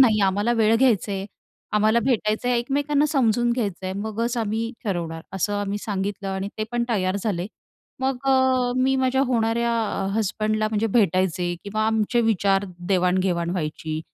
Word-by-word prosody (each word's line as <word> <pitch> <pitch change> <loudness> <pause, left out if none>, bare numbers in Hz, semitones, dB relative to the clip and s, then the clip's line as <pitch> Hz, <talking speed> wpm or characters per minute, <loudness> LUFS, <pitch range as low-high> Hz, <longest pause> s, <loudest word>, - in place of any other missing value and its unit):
"नाही, 220 -5 +5
आम्हाला 205 +5 +1
वेळ 225 -1 +3
घ्यायचं 225 -5 +2
आहे, 195 0 -3 0.5
आम्हाला 215 +2 +3
भेटायचं 225 -2 0
आहे, 245 - +2
एकमेकांना 285 +4 +1
समजून 240 -5 +2
घ्यायचं 205 -7 -3
आहे. 185 - -2
मगच 230 +3 -2
आम्ही 225 +1 -1
ठरवणार." 170 -5 -3
असं 195 +2 -1
आम्ही 205 0 -2
सांगितलं 200 -1 -3
आणि 190 +1 -3
ते 215 - 0
पण 240 0 +1
तयार 190 -4 0
झाले. 185 -5 -1 0.5
मग 265 0 0
अ, 260 -2 +3
मी 260 +1 +2
माझ्या 260 0 +1
होणाऱ्या 235 -1 +1 0.4
हजबंडला 215 0 0
म्हणजे 215 +1 0
भेटायचे 185 -4 +1
किंवा 215 +2 -1
आमचे 220 +2 +1
विचार, 200 -3 +2 0.2
देवाण-घेवाण 180 -2 +1
व्हायची. 155 -2 -3
215 Hz, 155 wpm, -23 LUFS, 195-240 Hz, 0.5 s, नाही